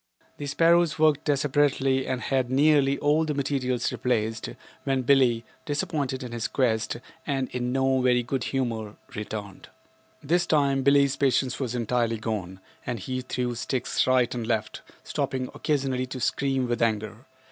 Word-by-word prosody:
The 145 - -5
sparrows 165 0 +3
worked 155 -1 +3
desperately 140 -2 +2
and 130 -1 -2
had 130 -2 0
nearly 140 0 +4
all 150 +3 +2
of 160 - -1
the 150 - -1
material 135 -3 0
replaced 110 -3 -1 0.3
when 135 -1 0
Billie, 125 -3 +3 0.2
disappointed 145 -3 -2
in 125 - -7
his 120 -1 -2
quest 110 -4 0 0.3
and 135 -3 -1
in 125 0 -2
no 135 0 +2
very 125 -1 +3
good 120 0 -2
humor, 115 -6 -2 0.2
returned. 105 -2 -6 0.5
This 175 +4 +1
time 140 -4 +2
Billie's 140 0 +4
patience 130 -2 +1
was 125 -3 -2
entirely 120 -1 0
gone 100 -4 -4 0.2
and 125 -1 -3
he 130 +5 -4
threw 125 -1 -2
sticks 125 +2 -1
right 130 -2 +3
and 120 -2 -4
left, 110 -2 -2 0.2
stopping 130 -1 -2
occasionally 135 -4 -1
to 130 +1 -6
scream 135 0 0
with 120 -1 -1
anger. 110 +1 -1
130 Hz, 155 wpm, -26 LUFS, 120-140 Hz, 0.5 s, nearly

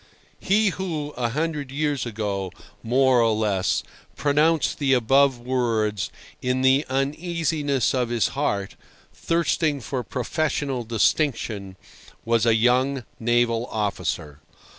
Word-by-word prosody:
He 210 +1 +3
who, 165 -6 -4
a 120 -2 -1
hundred 150 +1 -2
years 145 -2 -1
ago, 100 -4 -3 0.3
more 130 +1 +3
or 115 -1 +3
less, 105 -4 0 0.3
pronounced 150 +2 +2
the 135 -2 +2
above 135 +2 +4
words 115 -5 -1 0.3
in 125 +1 0
the 135 +3 +4
uneasiness 145 0 0
of 125 -2 0
his 120 -2 +1
heart, 100 -9 -2 0.4
thirsting 165 -3 0
for 130 0 -3
professional 135 0 -2
distinction, 110 -4 0 0.5
was 115 0 +2
a 115 - +5
young 125 +3 +2
naval 120 0 +1
officer. 85 -8 -3
130 Hz, 115 wpm, -24 LUFS, 115-145 Hz, 0.5 s, a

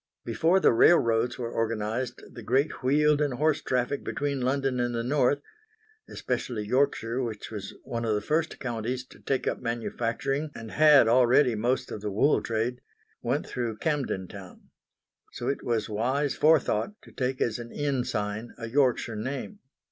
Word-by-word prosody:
Before 160 - +2
the - - +5
railways 115 -3 +4
were 115 -2 -4
organised 115 +2 -2
the 120 - -9
great 130 +7 0
wheeled 150 +3 +3
and 145 -4 0
horse 150 +3 +1
traffic 130 +2 -1
between 140 -2 -2
London 135 0 0
and 120 0 0
the 115 - -1
North 140 +2 +2 0.7
especially 110 -4 -3
Yorkshire 125 0 +1
which 110 -4 -5
was 100 -3 -6
one 115 -1 -4
of 110 -2 +1
the - - +1
first 155 +9 -1
Counties 125 +1 -3
to - - -17
take 135 -2 -1
up - - -1
manufacturing 120 +4 -2
and 115 -1 -8
had 150 -5 +6
already 125 +2 +5
most 120 +4 -1
of 105 - -5
the 105 - -3
wool 110 +9 +3
trade 115 +2 -2 0.4
went - - -1
through 115 -3 -3
Camden 135 - -1
Town. 95 -2 -12 0.6
So 120 - -5
it 140 - -2
was 115 -3 0
wise 130 +7 0
forethought 155 - +2
to - - -15
take 130 0 -2
as 115 0 0
an 120 0 -8
inn 140 -4 -1
sign 110 -1 -4
a 115 - -6
Yorkshire 125 -2 +1
name. 135 - -5
125 Hz, 165 wpm, -27 LUFS, 115-140 Hz, 0.7 s, had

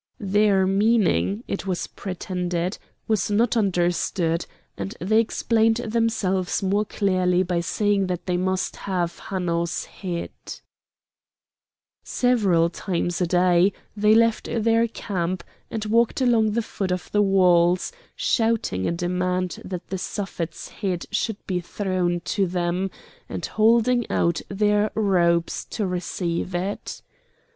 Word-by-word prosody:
Their 200 -1 +3
meaning, 200 - +2
it 195 0 -4
was 185 -2 -1
pretended, 180 -1 -3 0.3
was 215 -4 +1
not 220 +4 +2
understood, 175 -4 +1 0.3
and 95 -1 -6
they 210 +7 +3
explained 225 0 +2
themselves 220 -5 0
more 200 +2 +1
clearly 185 -3 +1
by 175 -1 -1
saying 200 +3 +1
that 180 -1 -3
they 180 - 0
must 185 +1 -1
have 175 -3 -2
Hanno's 170 -2 -1
head. 175 -3 -5 1.7
Several 200 -10 +2
times 175 -1 -2
a 180 - +2
day, 180 +2 +4 0.2
they 210 +1 +4
left 230 -1 +3
their 230 0 +2
camp, 185 -5 -3 0.3
and 220 -1 -4
walked 230 +4 +2
along 230 -4 +3
the 235 +1 0
foot 195 -3 -3
of 180 0 -3
the 210 - +3
walls, 180 -3 +4 0.2
shouting 225 - 0
a - - +1
demand 180 +1 -1
that 180 -2 -6
the 190 - -3
Suffet's 175 -4 -5
head 185 -4 -3
should 215 0 -1
be 180 -2 -1
thrown 180 -1 -1
to 195 +2 0
them, 180 +1 -1 0.4
and - - -4
holding 235 +2 +3
out 170 0 +1
their 210 +1 +2
robes 175 -5 +2
to 215 - -3
receive 180 -1 -2
it. 190 +3 -4
190 Hz, 125 wpm, -24 LUFS, 175-215 Hz, 1.7 s, day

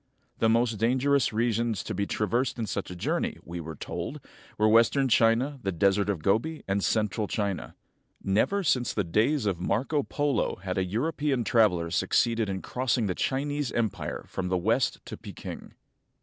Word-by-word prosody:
The 115 - +3
most 115 -1 +2
dangerous 130 +4 +2
regions 115 -1 0
to 110 - -4
be 100 +1 -1
traversed 120 +5 0
in 115 - -2
such 95 - -4
a 90 - -7
journey, 85 - -1
we 85 +1 -6
were 80 -1 -6
told, - - -5 0.4
were 110 - +3
western 115 +5 +4
China, 120 +5 +3
the 95 - -1
Desert 100 +3 +2
of 90 -7 -2
Gobi, 120 +11 0
and 100 0 0
central 110 -1 0
China. 100 -3 -3 0.5
Never 110 - +1
since 125 -7 +1
the 105 - +1
days 110 - +1
of 95 -4 0
Marco 130 - 0
Polo 145 -4 0
had 95 0 -3
a - - +2
European 135 - -1
traveler 90 -9 +2
succeeded 115 +4 +1
in 95 -1 -4
crossing 125 -2 0
the 95 - 0
Chinese 145 +4 -1
empire 110 -5 -2
from 95 - -4
the 90 0 +1
west 110 +8 +1
to - - -7
Peking. - - -9
110 Hz, 170 wpm, -27 LUFS, 95-125 Hz, 0.5 s, western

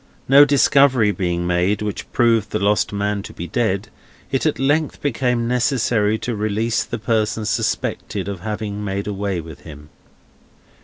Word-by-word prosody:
No 140 +2 +8
discovery 135 -5 +4
being 85 -3 -2
made, 90 +4 +1
which 105 -2 -5
proved 115 -4 +2
the - - -1
lost 105 0 +1
man 100 0 -1
to - - -10
be 85 - -6
dead, 100 +1 -1 0.4
it 135 +3 +1
at 155 - 0
length 145 +3 0
became 125 -3 0
necessary 120 -3 +1
to 120 +1 -4
release 110 +2 0
the - - -5
person 110 0 -1
suspected 100 -2 -2
of 100 -2 -5
having 105 0 -4
made 100 0 -3
away 100 -3 -2
with 80 -2 -11
him. 75 -1 -12
105 Hz, 155 wpm, -20 LUFS, 100-120 Hz, 0.4 s, No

